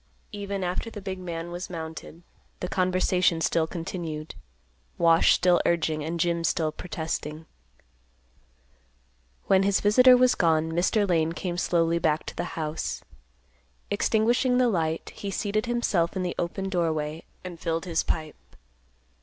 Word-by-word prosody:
Even 200 -2 -4
after 180 +5 -2
the 220 - -8
big 190 -1 -5
man 170 -1 -5
was 175 +2 -6
mounted, 160 0 -8 0.4
the 180 - -3
conversation 185 -2 +1
still 165 0 +1
continued; 165 -2 -5 0.6
Wash 165 -1 +5
still 180 -1 +3
urging 160 -3 0
and 165 +2 -3
Jim 170 0 +1
still 160 -2 +1
protesting. 160 -2 -5 2.0
When 190 - +4
his 195 0 +2
visitor 250 +5 +6
was 255 0 +4
gone, 160 -2 +2
Mr. 190 +5 +1
Lane 165 -2 +1
came 175 0 -4
slowly 170 -1 +1
back 155 -1 +1
to - - -7
the - - -2
house. 155 0 -3 0.9
Extinguishing 235 +4 +2
the 250 -1 +4
light, 165 -5 -1
he 200 - -6
seated 210 +3 -1
himself 210 -8 0
in 185 - -1
the 175 - -2
open 190 +3 -2
doorway, 160 -4 -1 0.2
and 180 -2 -8
filled 165 +1 -2
his 170 -3 0
pipe. 155 -1 -5
175 Hz, 140 wpm, -26 LUFS, 160-195 Hz, 2.0 s, visitor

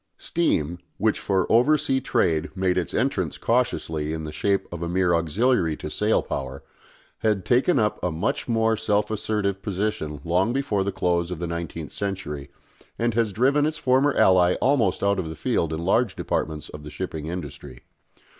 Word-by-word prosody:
Steam, 85 - 0 0.2
which 110 +1 +1
for 95 -2 +1
oversea 130 +2 +3
trade 80 -7 +1
made 95 -1 +1
its 90 - -1
entrance 135 +4 -1
cautiously 80 -11 0
in 80 -1 -4
the 75 - -5
shape 100 +6 0
of 85 - -6
a 85 - -2
mere 90 0 +2
auxiliary 85 - +1
to 75 - -6
sail 105 +1 +1
power, 65 0 -5 0.6
had 105 -4 0
taken 135 +7 +3
up 105 -6 0
a 90 - +1
much 80 0 -2
more 115 -1 +2
self 105 -1 0
assertive 105 -2 -1
position 100 -7 -2
long 90 +7 +1
before 130 -8 0
the 100 - -1
close 90 -2 0
of 90 - -4
the 85 - -3
nineteenth 85 -2 -5
century, 85 -8 -4 0.5
and 120 0 0
has 115 -2 +1
driven 135 +8 +2
its 155 - -3
former 135 +2 +3
ally 90 -1 +5
almost 115 -10 +1
out 100 -1 +2
of 85 -4 -3
the 80 - -6
field 80 +1 0
in 80 +1 -3
large 110 +3 +2
departments 75 -1 -2
of 75 - -9
the 75 - -9
shipping 80 -3 -5
industry. 75 -7 -7
95 Hz, 175 wpm, -24 LUFS, 85-110 Hz, 0.6 s, ally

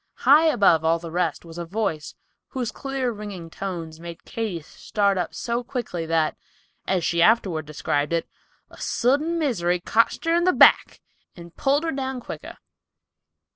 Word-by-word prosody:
High 295 +5 +7
above 200 - +4
all 165 +1 +3
the 165 0 -8
rest 175 -2 -1
was 165 +1 -9
a - - -3
voice, 165 -5 -3 0.3
whose 250 -4 -3
clear, 270 -2 -3
ringing 205 -6 -8
tones 165 -5 -6
made 170 0 -10
Katy 215 -7 -4
start 200 +5 -1
up 180 -3 -3
so 235 +1 -2
quickly 215 -10 -4
that, 165 -1 +1 0.5
as 185 -3 +1
she 170 0 +1
afterward 180 -7 +3
described 145 0 -1
it, 170 -1 0 0.4
"a - - -14
sudden 290 +8 +1
misery 180 - 0
cotched 230 - +1
her 330 - +2
in 345 +1 +3
the 365 - +4
back, - - +5 0.3
and 170 -1 -12
pulled 285 +2 +1
her 325 - -1
down 265 -1 -3
quicker." - - -9
195 Hz, 165 wpm, -24 LUFS, 165-255 Hz, 0.5 s, High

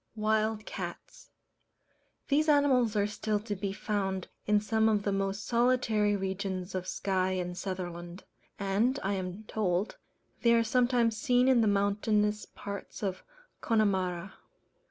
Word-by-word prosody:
Wild 215 0 0
Cats. - - -7 1.0
These 305 +2 +2
animals 265 -6 +4
are 205 -1 +3
still 210 0 -1
to 210 -1 -4
be 195 +1 -3
found 195 -2 -2 0.2
in 210 0 +4
some 220 +1 +2
of 210 -2 +1
the 200 - 0
most 195 +1 -2
solitary 235 -4 +2
regions 190 -1 -3
of 185 -1 -3
Skye 185 -1 0
and 180 -1 -3
Sutherland: 175 -1 -5 0.3
and, 210 +7 +1
I 195 +1 0
am 185 +2 -4
told, 200 -2 -1 0.4
they 235 -1 +5
are 230 - +4
sometimes 240 -1 +2
seen 250 -1 +3
in 255 -3 +5
the 220 - +3
mountainous 210 +1 +1
parts 200 +1 -8
of 190 -2 -2 0.4
Connemara. 190 -4 0
205 Hz, 135 wpm, -30 LUFS, 190-225 Hz, 1.0 s, they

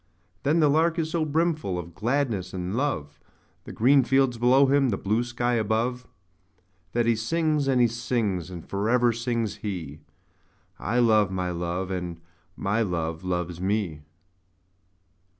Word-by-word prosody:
But 150 +4 +2
the 155 - +5
Lark 160 +3 +2
is 160 -1 -1
so 165 -2 0
brimful 155 - 0
of 85 -1 -7
gladness 115 - -1
and 90 +2 -3
love, 75 - -2 0.5
The - - -8
green 135 +4 +4
fields 130 -1 +2
below 130 +3 +5
him, 135 -1 +3
the 100 - 0
blue 110 +4 0
sky 120 0 -1
above, 115 +3 -1 0.9
That 120 -1 +1
he 115 0 +3
sings, 150 +5 0
and 130 -2 +3
he 120 - +5
sings; 115 -6 -2
and 85 -3 -9
for 100 +2 -1
ever 120 -1 +3
sings 115 -2 -2
he 85 -8 -5 0.8
'I 115 +4 -1
love 110 -4 +4
my 90 -1 -2
Love, 90 +2 -3
and 90 -2 -4 0.4
my 105 +3 0
Love 85 -4 -2
loves 90 -1 -3
me!' 95 -6 -1
115 Hz, 150 wpm, -26 LUFS, 90-130 Hz, 0.9 s, the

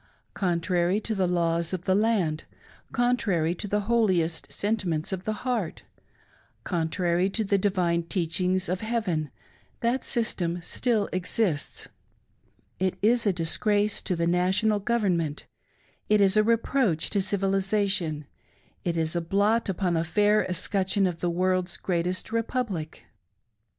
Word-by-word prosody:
Contrary 175 +1 +1
to 220 +1 -2
the 190 -3 +1
laws 170 -1 0
of 180 -2 -3
the 185 - +2
land; 195 -7 +1 0.5
contsrary 220 -10 +1
to 195 +4 -6
the 210 +1 0
holiest 190 -7 +1
sentiments 190 -7 -1
of 190 0 -5
the 215 - 0
heart; 235 -9 -2 0.8
contrary 175 +1 0
to 220 +3 -1
the 200 -1 +1
divine 180 -4 +1
teachings 180 +2 0
of 180 +2 -2
Heaven, 210 -10 -1 0.5
that 240 +2 0
system 180 -7 -1
still 225 +1 0
'exists! 180 -4 -1 0.9
It 185 0 0
is 235 +1 +3
a - - +5
disgrace 205 +5 +1
to 180 - -1
the 170 0 0
National 185 +5 +2
Government; 190 -9 0 0.6
it 210 0 +5
is 195 0 +4
a 215 - +6
reproach 225 - +1
to 200 - +2
Civilisation; 195 -5 0 0.6
it 170 -1 -1
is 160 +1 0
a 170 - +1
blot 205 +6 +1
upon 185 -1 0
the 165 -1 +1
fair 210 +5 +3
escutcheon 190 +2 +1
of 175 -2 -2
the 175 - 0
World's 185 +1 0
Greatest 180 +2 -2
Republic 230 -8 -3
185 Hz, 135 wpm, -26 LUFS, 170-210 Hz, 0.9 s, a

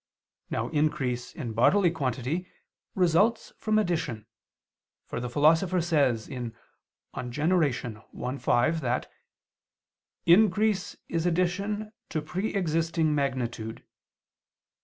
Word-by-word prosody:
Now 115 +2 -2
increase 135 -5 0
in 120 -8 -5
bodily 175 - +4
quantity 135 +5 -2 0.5
results 195 +6 +2
from 215 -1 +1
addition; 160 - -1 0.8
for - - -4
the 125 0 -4
Philosopher 165 +7 +3
says 140 -10 +2
(De 125 -4 -5 0.6
Gener. 125 -4 -1
i, - - -5
5) 160 +7 +2
that 125 -1 -1 1.1
"increase 205 +2 +3
is 165 +1 -1
addition 200 +5 -1 0.2
to 160 - -1
pre 180 +7 -3
existing 165 -3 +1
magnitude." 120 -5 -2
155 Hz, 95 wpm, -28 LUFS, 125-180 Hz, 1.1 s, bodily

